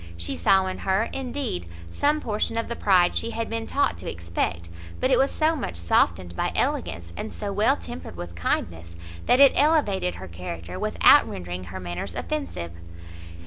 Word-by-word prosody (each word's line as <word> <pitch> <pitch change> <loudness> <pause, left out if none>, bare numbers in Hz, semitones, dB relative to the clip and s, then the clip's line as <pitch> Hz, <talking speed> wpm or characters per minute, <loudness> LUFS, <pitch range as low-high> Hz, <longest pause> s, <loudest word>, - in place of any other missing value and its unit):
She 85 0 -3
saw 190 - +4
in 185 - -4
her, 195 +4 +1
indeed, 260 - -3 0.2
some 300 - +1
portion 215 +1 -1
of 230 - -2
the 235 - -2
pride 185 -5 +3
she 230 - -1
had 230 0 -4
been 225 0 -3
taught 285 - +1
to - - -5
expect, 85 0 -3 0.3
but 255 - +1
it 255 - +5
was 270 +1 +3
so 315 +1 +1
much 260 - -4
softened 85 +1 +1
by - - -1
elegance, 85 0 -1
and - - -5
so 200 -1 -4
well 220 +8 +3
tempered 240 - -8
with 85 0 -7
kindness, 85 0 -2 0.3
that 250 - +5
it 280 -1 +9
elevated 240 - +2
her 95 - -8
character, 85 +1 -7
without - - +5
rendering 90 0 -6
her 95 +2 -7
manners 85 -1 -5
offensive. 85 -1 -4
175 Hz, 180 wpm, -25 LUFS, -, 0.3 s, it